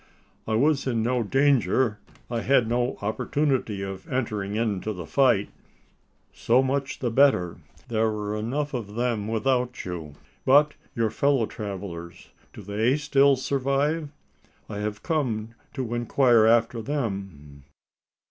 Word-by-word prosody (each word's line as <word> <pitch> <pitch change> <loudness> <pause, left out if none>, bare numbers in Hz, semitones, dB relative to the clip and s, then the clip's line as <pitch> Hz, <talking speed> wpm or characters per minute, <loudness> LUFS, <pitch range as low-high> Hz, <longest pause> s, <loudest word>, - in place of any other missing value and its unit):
"I 110 - 0
was 140 +3 +2
in 115 -3 0
no 125 +1 +1
danger: 130 -3 +2 0.3
I 120 -1 -2
had 125 -3 +3
no 120 +2 0
opportunity 120 -2 -1
of 95 -1 -7
entering 105 -6 -2
into 110 -2 -1
the 90 -4 -7
fight." 125 - +2 0.8
"So 125 +3 +3
much 135 +1 -1
the 120 -3 -2
better 115 -10 +3 0.3
there 110 -1 +1
were 105 -1 -3
enough 140 +8 -2
of 105 -5 -5
them 115 -3 -1
without 125 +3 0
you. 80 -5 -6 0.3
But 145 +3 +5 0.2
your 115 -3 +1
fellow 140 0 +2
travellers? 95 -6 -7 0.2
Do 105 - -11
they 110 +7 +1
still 140 -2 +4
survive? 140 +4 0 0.6
I 105 -1 -6
have 105 0 -4
come 120 -10 -1 0.3
to 125 -3 -3
inquire 120 -1 +4
after 115 0 +3
them." 95 - -4
115 Hz, 130 wpm, -25 LUFS, 105-135 Hz, 0.8 s, But